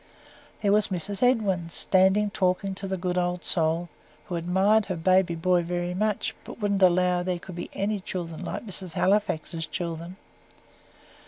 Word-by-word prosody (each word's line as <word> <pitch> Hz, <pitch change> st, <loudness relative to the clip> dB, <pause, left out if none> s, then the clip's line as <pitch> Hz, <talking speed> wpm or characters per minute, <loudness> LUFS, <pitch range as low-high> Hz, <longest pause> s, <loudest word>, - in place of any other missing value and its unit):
There 200 Hz, -, +3 dB
was 210 Hz, 0 st, +3 dB
Mrs. 195 Hz, +2 st, -4 dB
Edwin, 205 Hz, -9 st, +2 dB
standing 190 Hz, +4 st, +3 dB
talking 190 Hz, 0 st, 0 dB
to 195 Hz, +1 st, -6 dB
the 190 Hz, 0 st, -2 dB
good 180 Hz, 0 st, -1 dB
old 175 Hz, 0 st, -1 dB
soul, 165 Hz, 0 st, 0 dB, 0.4 s
who 180 Hz, -, -4 dB
admired 190 Hz, +5 st, +2 dB
her 185 Hz, -, -2 dB
baby 185 Hz, +1 st, +2 dB
boy 175 Hz, +2 st, +2 dB
very 175 Hz, +1 st, -2 dB
much, 210 Hz, +2 st, -1 dB
but -, -, -10 dB
wouldn't 200 Hz, -2 st, 0 dB
allow 180 Hz, -1 st, +4 dB
there 180 Hz, 0 st, -1 dB
could 180 Hz, +2 st, -10 dB
be 175 Hz, 0 st, -6 dB
any 205 Hz, +1 st, -1 dB
children 175 Hz, -3 st, -6 dB
like -, -, -5 dB
Mrs. 185 Hz, -4 st, +1 dB
Halifax's 165 Hz, -5 st, 0 dB
children. 170 Hz, +1 st, -5 dB
185 Hz, 160 wpm, -26 LUFS, 175-195 Hz, 0.4 s, allow